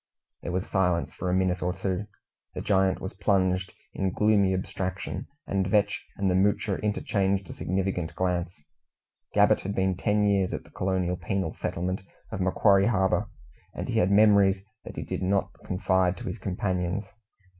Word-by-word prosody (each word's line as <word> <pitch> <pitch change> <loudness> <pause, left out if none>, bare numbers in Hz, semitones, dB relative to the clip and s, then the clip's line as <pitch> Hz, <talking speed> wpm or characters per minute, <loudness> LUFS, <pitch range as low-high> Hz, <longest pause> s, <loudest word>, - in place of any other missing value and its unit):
There 85 - -4
was 95 +1 -1
silence 90 -3 0
for 90 - -3
a - - +1
minute 95 -1 +1
or 90 0 0
two. 95 +1 -2 0.5
The - - -3
giant 95 -1 +2
was 95 - -6
plunged 95 -2 +1 0.2
in 95 - 0
gloomy 100 0 +3
abstraction, 95 0 -3 0.2
and 95 -1 0
Vetch 100 +1 +1
and 100 - 0
the 90 - +3
Moocher 100 +1 +1
interchanged 100 -2 0
a - - -6
significant 95 -2 -2
glance. 90 -3 -2 0.7
Gabbett - - +5
had 100 +1 -4
been 95 -1 +1
ten 105 +3 +1
years 100 -2 +2
at - - -4
the - - -19
colonial 90 -1 -1
penal 95 -5 -2
settlement 90 +3 -3 0.3
of 95 - -3
Macquarie 100 +2 +4
Harbour, 95 -5 +1 0.5
and - - -4
he - - +2
had 90 - +3
memories 100 -2 +5 0.2
that - - -8
he - - -4
did - - -4
not 95 +1 0
confide 95 -1 +1
to - - -8
his 115 - -4
companions. 95 0 -2
95 Hz, 165 wpm, -27 LUFS, 90-100 Hz, 0.7 s, Gabbett